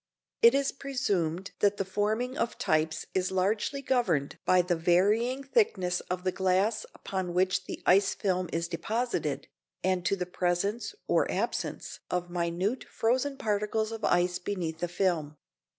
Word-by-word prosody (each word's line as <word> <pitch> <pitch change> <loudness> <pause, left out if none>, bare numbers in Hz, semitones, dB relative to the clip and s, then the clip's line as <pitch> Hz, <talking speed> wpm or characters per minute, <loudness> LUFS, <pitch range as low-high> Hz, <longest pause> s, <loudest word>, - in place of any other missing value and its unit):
It 235 +3 +7
is 275 0 +2
presumed 200 - -2
that 205 0 +3
the 195 - -1
forming 215 +6 -1
of 235 -3 -1
types 155 0 0
is 185 -1 +1
largely 205 +9 0
governed 190 - +1
by 185 -1 +5
the 175 0 +1
varying 210 +10 +2
thickness 195 - +1
of 180 0 -2
the 185 - +1
glass 190 +4 +1
upon 185 -2 -4
which 185 0 +2
the - - -7
ice 195 +2 +4
film 185 -3 -1
is 170 0 -1
deposited, 230 +9 -2 0.4
and 185 -1 +1
to - - +2
the 180 -2 -3
presence 180 - -1
or - - +2
absence - - -3
of 175 -1 -2
minute 175 +7 -1
frozen 260 +5 0
particles 215 0 0
of 225 -1 -6
ice 175 0 +2
beneath 175 -4 -3
the 175 - -1
film. 170 -5 -1
190 Hz, 150 wpm, -29 LUFS, 175-225 Hz, 0.4 s, It